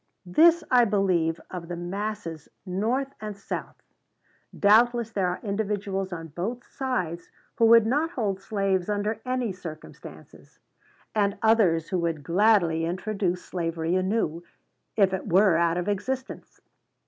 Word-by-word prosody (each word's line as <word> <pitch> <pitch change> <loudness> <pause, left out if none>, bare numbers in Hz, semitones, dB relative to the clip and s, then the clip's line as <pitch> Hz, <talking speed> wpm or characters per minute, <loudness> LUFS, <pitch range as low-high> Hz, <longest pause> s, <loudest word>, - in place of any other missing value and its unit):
This 325 - +5
I 250 -1 +6
believe 185 -6 +1
of 175 -2 -6
the 175 - -4
masses 175 -2 -5 0.2
North 230 +9 -1
and 210 -2 -6
South. 200 - -6 0.8
Doubtless 230 +2 +4
there 195 -4 0
are 180 - -2
individuals 200 -2 -2
on 165 -2 -6
both 210 - -5
sides 180 -11 -3 0.3
who 230 - +5
would 230 -1 +7
not 295 +8 +1
hold 205 - -2
slaves 195 -2 -1
under 210 +2 -1
any 255 -4 -1
circumstances; 165 -4 -11 0.6
and 200 -2 +1
others 190 -8 +3
who 185 - 0
would 165 -3 -2
gladly 175 -2 +3
introduce 185 +1 -2
slavery 165 -1 -2
anew, 185 -3 0 0.5
if 195 -3 +3
it 190 - -3
were 190 0 +4
out 170 0 +2
of 180 +1 -2
existence. 255 +6 -4
195 Hz, 135 wpm, -26 LUFS, 175-220 Hz, 0.8 s, would